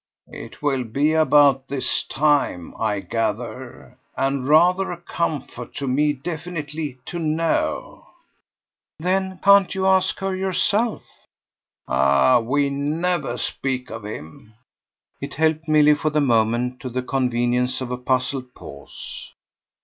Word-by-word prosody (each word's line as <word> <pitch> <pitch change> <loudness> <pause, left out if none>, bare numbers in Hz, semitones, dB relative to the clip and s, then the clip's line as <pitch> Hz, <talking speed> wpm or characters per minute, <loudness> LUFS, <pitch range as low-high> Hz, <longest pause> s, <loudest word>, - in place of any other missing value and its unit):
"It - - -10
will 135 -3 +1
be 140 +7 +1
about 145 -4 +4
his 135 -2 0
time, 145 - 0
I 100 -1 0
gather, 120 +3 -4 0.2
and 135 -1 -1
rather 180 +5 +4
a 175 - -5
comfort 155 -7 -4
to 140 - -3
me 145 +4 +2
definitely 155 -1 -5
to 175 - -5
know." 160 +1 -1 0.9
"Then 190 +2 -1
can't 200 -1 +5
you 190 0 -1
ask 190 -1 +3
her 195 -1 -2
yourself?" 200 +4 0 0.8
"Ah 70 - +4
we 140 +4 0
never 160 +6 -1
speak 130 -3 -3
of 110 -1 -7
him!" 105 +2 -9 0.7
It 140 +1 -6
helped 160 +1 +1
Milly 150 -1 +5
for 150 +1 -1
the 150 0 +1
moment 120 -1 +1
to 130 - -6
the 125 +1 -3
convenience 125 -1 0
of 130 -1 -5
a 125 - -2
puzzled 130 0 -2
pause. 70 0 -10
140 Hz, 125 wpm, -22 LUFS, 125-160 Hz, 0.9 s, can't